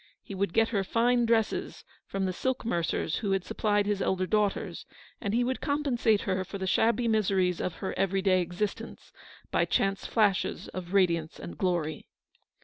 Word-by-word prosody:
He -, -, -8 dB
would 195 Hz, -1 st, -1 dB
get 225 Hz, +4 st, +3 dB
her 200 Hz, -4 st, 0 dB
fine 235 Hz, +3 st, +2 dB
dresses 225 Hz, -2 st, 0 dB, 0.2 s
from 195 Hz, -1 st, -2 dB
the 185 Hz, -, -1 dB
silk 260 Hz, +5 st, -2 dB
mercers 170 Hz, -5 st, -1 dB
who 200 Hz, -2 st, -1 dB
had 195 Hz, -2 st, 0 dB
supplied 205 Hz, -1 st, +1 dB
his 205 Hz, -1 st, -1 dB
elder 185 Hz, 0 st, +1 dB
daughters, 210 Hz, 0 st, -1 dB, 0.3 s
and 200 Hz, -, -2 dB
he 240 Hz, +3 st, +2 dB
would 255 Hz, +1 st, -2 dB
compensate 265 Hz, -7 st, +1 dB
her 190 Hz, -1 st, -1 dB
for 195 Hz, +2 st, -7 dB
the 190 Hz, -, -3 dB
shabby 230 Hz, +5 st, +2 dB
miseries 190 Hz, -5 st, +1 dB
of 180 Hz, -, -2 dB
her 190 Hz, -, -4 dB
every 195 Hz, 0 st, 0 dB
day 185 Hz, -2 st, +4 dB
existence 200 Hz, +6 st, -4 dB, 0.4 s
by -, -, +3 dB
chance 195 Hz, 0 st, 0 dB
flashes 205 Hz, -4 st, +1 dB
of 185 Hz, +1 st, -6 dB
radiance 170 Hz, -5 st, +2 dB
and -, -, -7 dB
glory. 170 Hz, -5 st, -1 dB
195 Hz, 175 wpm, -29 LUFS, 185-225 Hz, 0.4 s, day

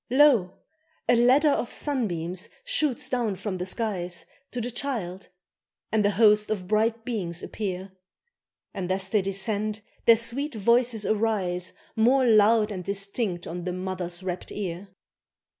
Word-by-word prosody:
Lo! 250 Hz, -9 st, +4 dB, 0.5 s
a -, -, +5 dB
ladder 260 Hz, +6 st, +5 dB
of 245 Hz, -, -1 dB
sunbeams 185 Hz, -, -2 dB, 0.2 s
shoots 300 Hz, -, +2 dB
down 240 Hz, -6 st, -1 dB
from 190 Hz, 0 st, -4 dB
the 180 Hz, -, -3 dB
skies 185 Hz, -5 st, -2 dB, 0.2 s
To 250 Hz, -, -5 dB
the 240 Hz, +1 st, -3 dB
child, 220 Hz, -8 st, -3 dB, 0.6 s
and 215 Hz, -1 st, +2 dB
a 205 Hz, -, +4 dB
host 210 Hz, 0 st, +4 dB
of 195 Hz, -4 st, -3 dB
bright 225 Hz, +2 st, +1 dB
beings 180 Hz, -8 st, -3 dB
appear; 190 Hz, -2 st, -4 dB, 0.8 s
And 185 Hz, -2 st, -3 dB
as 190 Hz, 0 st, -1 dB
they 210 Hz, 0 st, +2 dB
descend 205 Hz, +2 st, -2 dB, 0.3 s
their 230 Hz, -, +9 dB
sweet 240 Hz, +5 st, -2 dB
voices 235 Hz, +1 st, +2 dB
arise 195 Hz, -5 st, 0 dB, 0.2 s
More 250 Hz, +4 st, +4 dB
loud 215 Hz, -1 st, +5 dB
and 185 Hz, -3 st, -5 dB
distinct 200 Hz, -1 st, -2 dB
on 175 Hz, +1 st, -5 dB
the 180 Hz, 0 st, -3 dB
mother's 185 Hz, -1 st, -3 dB
rapt 180 Hz, -1 st, -5 dB
ear. 190 Hz, -1 st, -5 dB
210 Hz, 140 wpm, -26 LUFS, 185-235 Hz, 0.8 s, their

